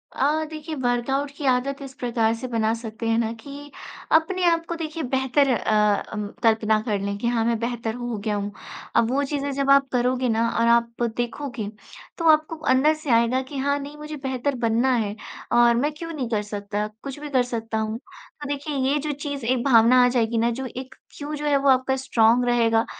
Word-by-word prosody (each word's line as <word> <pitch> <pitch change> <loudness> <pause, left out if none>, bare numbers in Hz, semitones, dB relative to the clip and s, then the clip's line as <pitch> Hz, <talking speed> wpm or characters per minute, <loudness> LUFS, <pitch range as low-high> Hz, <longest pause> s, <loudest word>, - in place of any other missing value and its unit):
अ, 300 +4 +1
देखिए, 310 0 -6
वर्कआउट 260 +2 0
की 290 - -6
आदत 265 +2 +1
इस 270 -1 -8
प्रकार 230 -2 +1
से 255 +3 -6
बना 225 -2 0
सकते 225 0 -6
हैं 225 - +2
ना 230 -1 0
कि 285 +1 -10 0.4
अपने 340 +4 +2
आप 335 -1 +2
को 340 - -2
देखिए, 320 -1 -4
बेहतर 265 +2 +1
अ 215 - -1 0.4
अम, 210 -1 -3 0.2
कल्पना 220 -1 +3
कर 205 -2 0
लें 200 0 -3
कि 235 - -2
हाँ, 235 -1 +1
मैं 235 0 +1
बेहतर 235 -1 -3
हो 240 -2 -4
गया 210 0 -2
हूँ। 205 0 -3 0.4
अब 235 +1 +3
वो 280 +2 +1
चीज़ें 285 0 -2
जब 275 0 -1
आप 275 0 +5
करोगे 250 0 +1
ना, 230 +1 +1
और 230 0 +1
आप 235 0 +2 0.2
देखोगे, 240 -1 -3 0.5
तो 335 - 0
आपको 310 +1 +1 0.2
अंदर 295 +4 +4
से 310 -2 -8
आएगा 235 +3 +3
कि, 265 +2 -8
"हाँ, 280 +1 +1
नहीं, 285 +1 -8
मुझे 300 0 -7
बेहतर 265 +1 -1
बनना 230 +4 +2
है 210 -3 -1 0.4
और 240 0 +5
मैं 285 +6 +1
क्यों 330 0 -6
नहीं 260 -6 -3
कर 215 -3 0
सकता? 205 0 -4 0.2
कुछ 275 0 -6
भी 295 0 -7
कर 260 -3 +2
सकता 225 -2 -4
हूँ।" 220 +1 -2
तो 295 +1 -13
देखिए, 290 +1 -3
ये 270 +2 +1
जो 300 +1 -3
चीज़ 285 -3 -5
एक 245 0 +1
भावना 250 -1 +6
आ - - +5
जाएगी 235 -2 0
ना, 230 +1 +2
जो 260 +3 -4
एक 260 +1 -7 0.2
क्यों 295 +1 -5
जो 295 - -5
है, 290 -1 +3
वो 275 0 +2
आपका 260 0 +3
स्ट्रॉन्ग 245 -2 +3
रहेगा, 230 -2 +2
250 Hz, 215 wpm, -24 LUFS, 230-285 Hz, 0.5 s, भावना